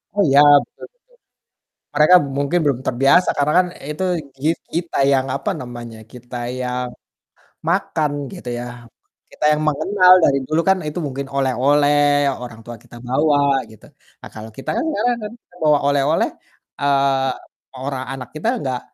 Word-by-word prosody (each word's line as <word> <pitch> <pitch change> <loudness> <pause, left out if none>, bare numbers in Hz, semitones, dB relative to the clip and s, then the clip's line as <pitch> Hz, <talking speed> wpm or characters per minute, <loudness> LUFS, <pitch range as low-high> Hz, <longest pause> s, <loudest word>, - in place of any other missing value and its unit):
Oh 205 - +2
iya, 140 +1 +5 0.3
betul. - - -13 1.1
Mereka 150 +4 +6 0.2
mungkin 140 +5 +1
belum 140 -4 +1
terbiasa 135 +8 +3
karena 145 +1 +1
kan 180 - +2 0.2
itu 150 +5 -4 0.3
kit 155 +5 0 0.2
kita 170 0 -2
yang, 135 -1 +2
apa 140 - -3
namanya, 120 -2 -9
kita 125 0 -11 0.3
yang 125 0 -3 0.8
makan 165 -4 0 0.2
gitu 180 -10 -8
ya. - - -5 0.7
Kita - - -8
yang 150 0 +1
mengenal, 180 +5 +3
dari 140 - +4
dulu 155 +1 0
kan 190 - +4
itu 150 +3 -4
mungkin 140 0 -5
oleh-oleh, 145 +2 +2 0.2
orang 120 -2 -9
tua 120 - -8
kita - - -16
bawa, 145 +3 +2 0.3
gitu. 110 - -17 0.4
Nah, - - -10
kalau 110 0 -9
kita 135 - -7
kan - - 0
ngarang 245 -5 0
kan, 210 - -6 0.3
bawa 150 -1 +5
oleh-oleh, 145 +2 +2 0.5
eee, 135 -1 +2 0.4
mau 130 - -11
ora 135 -2 -3
anak 125 -3 -8
kita 155 +8 -4
nggak 130 -6 -3
140 Hz, 150 wpm, -19 LUFS, 130-155 Hz, 1.1 s, Mereka